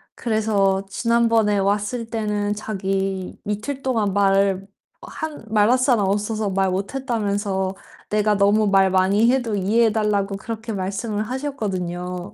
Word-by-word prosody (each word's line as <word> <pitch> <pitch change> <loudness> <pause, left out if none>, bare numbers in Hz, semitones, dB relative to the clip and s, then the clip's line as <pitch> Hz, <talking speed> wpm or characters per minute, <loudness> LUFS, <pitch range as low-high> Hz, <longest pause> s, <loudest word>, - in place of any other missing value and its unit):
그래서 205 -4 +1
지난번에 230 -1 +2
왔을 205 +4 0
때는 210 -2 -1
자기 195 -2 -3
"이틀 215 +7 -3
동안 225 -7 0
말 195 -1 +2 0.4
한 315 -7 -6
말할 220 +3 +4
사람 245 -6 +2
없어서 210 +1 -1
말 190 0 +1
못 195 +6 -3
했다."면서 200 -6 -1 0.3
"내가 210 0 +2
너무 205 +2 +3
말 195 -1 +4
많이 195 +5 +3
해도 245 -5 0
이해해 215 +4 +2
달라."고 205 -2 0
그렇게 225 +2 -6
말씀을 200 +2 -3
하셨거든요. 185 -9 -4
205 Hz, 280 characters per minute, -22 LUFS, 195-225 Hz, 0.4 s, 말할